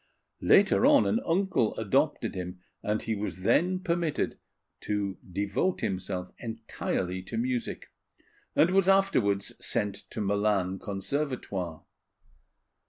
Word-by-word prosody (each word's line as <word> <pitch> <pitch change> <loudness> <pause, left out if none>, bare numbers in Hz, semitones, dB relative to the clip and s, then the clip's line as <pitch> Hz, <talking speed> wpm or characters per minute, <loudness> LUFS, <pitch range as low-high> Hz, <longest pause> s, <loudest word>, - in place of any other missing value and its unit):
Later 205 +3 +5
on 290 -1 +6
an 225 - +2
uncle 170 - +1
adopted - - +1
him; 90 0 -5 0.2
and 105 +1 -1
he 115 - -1
was 100 -3 -4
then 180 - +3
permitted 170 -4 -1 0.4
to 100 -2 -2
devote 100 - 0
himself 90 -1 -3
entirely 110 -5 -3
to 115 +5 -6
music, 125 +1 -2 0.6
and 170 - +5
was 195 0 +4
afterwards 125 - +3
sent 100 -1 -1
to - - -6
Milan 100 -2 +1
Conservatoire. 100 - -3
105 Hz, 110 wpm, -29 LUFS, -, 0.6 s, on